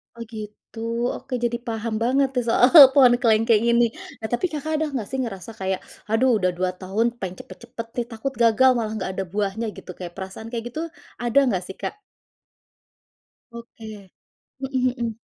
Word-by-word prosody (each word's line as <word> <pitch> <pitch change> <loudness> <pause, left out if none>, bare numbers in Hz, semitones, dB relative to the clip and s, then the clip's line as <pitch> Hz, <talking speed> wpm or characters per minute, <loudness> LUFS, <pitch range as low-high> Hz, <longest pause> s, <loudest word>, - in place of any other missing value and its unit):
Oh, 235 - -7
gitu. 215 +1 -9 0.4
Oke, 265 - -10
jadi 235 0 0
paham 225 0 -3
banget 270 +3 +3
nih, 250 - +1
soal 240 +2 +5 0.3
pohon 260 -4 +7
kelengkeng 225 -1 +4
ini. 235 0 +4 0.4
Nah, 220 - -3
tapi 305 - +1
Kakak 310 +1 -4
ada 315 - +1
nggak 225 -6 -3
sih, 265 - -3
ngerasa 200 -2 -6
kayak, 190 0 -1 0.3
"Aduh, 230 +1 +3
udah 185 -2 +1
2 185 0 0
tahun, 195 +5 0
pengen 185 -1 -5
cepat-cepat 235 -1 -9
nih, 240 - 0
takut 245 +5 -4
gagal 230 +3 +5
malah 220 -2 -2
nggak 185 -1 -3
ada 195 - 0
buahnya," 205 +4 -2
gitu, - - -9
kayak 175 -2 -7
perasaan 195 +4 -7
kayak 230 -1 -3
gitu, 315 - -4 0.4
ada 240 +3 +4
nggak 185 -4 -1
sih, 190 - -8
Kak? - - -4 1.5
Oke. 220 -4 -11 0.5
Mhm 260 -2 0
mhm. 230 -2 -3
225 Hz, 170 wpm, -23 LUFS, 205-245 Hz, 1.5 s, pohon